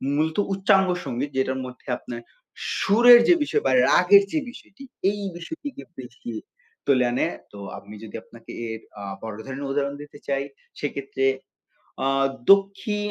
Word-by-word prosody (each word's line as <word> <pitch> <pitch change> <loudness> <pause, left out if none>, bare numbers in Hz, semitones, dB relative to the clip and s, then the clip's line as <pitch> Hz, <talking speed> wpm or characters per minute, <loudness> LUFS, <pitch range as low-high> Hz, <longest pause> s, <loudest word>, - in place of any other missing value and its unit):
মূলত 155 +2 0 0.2
উচ্চাঙ্গ 195 0 +4 0.2
সঙ্গীত 130 +4 -3
যেটার 130 0 0
মধ্যে 125 0 -11
আপনার 120 -1 -8 0.6
সুরের 240 +4 +8
যে - - +8
বিষয় - - 0
বা 135 - +3 0.2
রাগের 200 +3 +6
যে 315 - +2
বিষয়টি 240 +1 -14 0.3
এই 205 0 -5 0.2
বিষয়টিকে 280 - -7 0.2
বেশি 120 -1 -8 0.5
তুলে 130 -3 +4
আনে। 120 - +1 0.3
তো 105 - -12 0.2
আমি 105 +2 -11
যদি 110 - -9
আপনাকে 115 -1 -14 0.2
এর 110 0 -5 0.2
আ - - -7 0.2
বড় 110 -2 -6
ধরনের 135 +1 -5
উদাহরণ 140 0 -1
দিতে 145 0 -12
চাই 140 0 0 0.4
সেক্ষেত্রে 135 -2 -2 0.8
আ - - +3 0.4
দক্ষী 200 +2 +3
145 Hz, 145 wpm, -24 LUFS, 130-195 Hz, 0.8 s, সুরের